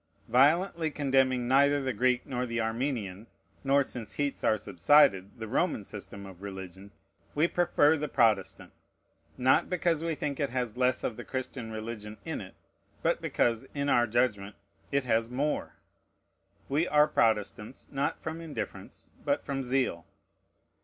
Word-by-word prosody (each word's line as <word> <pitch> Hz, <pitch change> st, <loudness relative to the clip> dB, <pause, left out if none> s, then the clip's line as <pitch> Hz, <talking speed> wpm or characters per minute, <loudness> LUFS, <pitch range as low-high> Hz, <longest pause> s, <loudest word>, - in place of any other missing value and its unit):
Violently 160 Hz, +7 st, +3 dB
condemning 130 Hz, -4 st, +1 dB
neither 140 Hz, +2 st, +4 dB
the 130 Hz, -2 st, -2 dB
Greek 125 Hz, +3 st, +1 dB
nor 125 Hz, -1 st, -3 dB
the 115 Hz, 0 st, -2 dB
Armenian, 115 Hz, -3 st, -2 dB, 0.4 s
nor, 140 Hz, +1 st, +4 dB
since 120 Hz, -4 st, -7 dB
heats 145 Hz, -1 st, -2 dB
are 110 Hz, -, +3 dB
subsided, 100 Hz, -, +3 dB
the 110 Hz, -1 st, -6 dB
Roman 135 Hz, -, 0 dB
system 100 Hz, 0 st, -9 dB
of 95 Hz, -2 st, -12 dB
religion, 95 Hz, -1 st, -8 dB, 0.5 s
we 155 Hz, +3 st, +3 dB
prefer 165 Hz, -4 st, +3 dB
the 150 Hz, 0 st, -2 dB
Protestant: 95 Hz, -7 st, +1 dB, 0.6 s
not 130 Hz, +1 st, +3 dB
because 170 Hz, -3 st, 0 dB
we 165 Hz, -1 st, -1 dB
think 145 Hz, -2 st, -3 dB
it 140 Hz, -2 st, 0 dB
has 125 Hz, -3 st, -2 dB
less 125 Hz, 0 st, +1 dB
of 115 Hz, -, -2 dB
the -, -, -6 dB
Christian 130 Hz, -3 st, -5 dB
religion 110 Hz, -1 st, -6 dB
in -, -, -4 dB
it, -, -, -11 dB, 0.5 s
but -, -, +1 dB
because, 115 Hz, +2 st, 0 dB
in 140 Hz, 0 st, -1 dB
our 120 Hz, -2 st, +4 dB
judgment, 110 Hz, -4 st, 0 dB, 0.4 s
it 140 Hz, 0 st, +1 dB
has 115 Hz, -2 st, +1 dB
more. 140 Hz, +4 st, -2 dB, 0.9 s
We 150 Hz, +5 st, +1 dB
are 150 Hz, 0 st, +5 dB
Protestants, 110 Hz, -3 st, 0 dB
not 140 Hz, 0 st, -1 dB
from 160 Hz, +1 st, -5 dB
indifference, 160 Hz, -3 st, -7 dB
but -, -, 0 dB
from 135 Hz, -1 st, -3 dB
zeal. 125 Hz, -10 st, -1 dB
125 Hz, 150 wpm, -29 LUFS, 110-140 Hz, 0.9 s, are